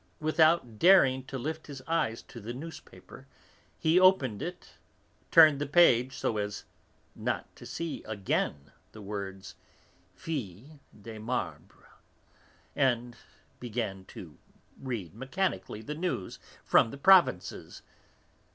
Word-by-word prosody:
Without 155 -7 +2
daring 135 -9 +5
to 135 - -6
lift 155 +5 -5
his 140 -3 -8
eyes 160 -9 -1
to 120 - -12
the 115 +4 -6
newspaper, 160 +4 -11 0.5
he 160 +3 +3
opened 165 - +3
it, 175 +1 -7 0.6
turned 155 -4 +7
the 145 - -1
page 135 -5 +4
so 110 - -1
as 105 0 -4 0.5
not - - -4
to - - -12
see 165 -2 -5
again 95 -9 -2 0.2
the 110 - -11
words, 95 -1 -6 0.6
Filles 140 - -6 0.2
de 110 +2 -9
Marbre, 120 +4 -5 0.9
and 125 -3 0 0.4
began 110 -5 -4
to 80 -5 -12 0.4
read 115 -11 -5
mechanically 125 - -3
the 150 - -5
news 160 - -4 0.2
from - - +4
the 140 - -9
provinces. 180 - +3
130 Hz, 115 wpm, -29 LUFS, 105-160 Hz, 0.9 s, turned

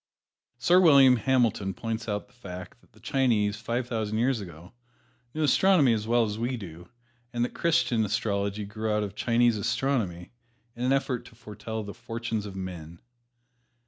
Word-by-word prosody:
Sir 170 +9 +4
William 140 -7 +7
Hamilton 115 -7 +1
points 115 +2 -4
out 105 0 -2
the - - -28
fact 90 -2 -10
that - - -28
the 110 - -20
Chinese, 110 -7 +1
five 115 +3 -3
thousand 110 -3 -2
years 120 0 +1
ago, 85 +1 -11 0.6
knew 155 - 0
astronomy 150 -3 +4
as 110 -1 -2
well 120 0 +3
as 105 0 -4
we 120 +2 -1
do, 85 -4 -10 0.4
and 120 0 0
that - - -7
Christian 160 -9 +1
astrology 100 -1 -1
grew 110 +2 -3
out 105 0 +1
of 100 -1 -5
Chinese 120 +1 +2
astronomy, 115 -6 -1 0.4
in 120 - -5
an 130 - +2
effort 135 -2 0
to - - -15
foretell 110 0 -6
the 100 0 -7
fortunes 115 -2 -4
of 95 - -9
men. 85 -3 -7
115 Hz, 170 wpm, -27 LUFS, 105-125 Hz, 0.6 s, William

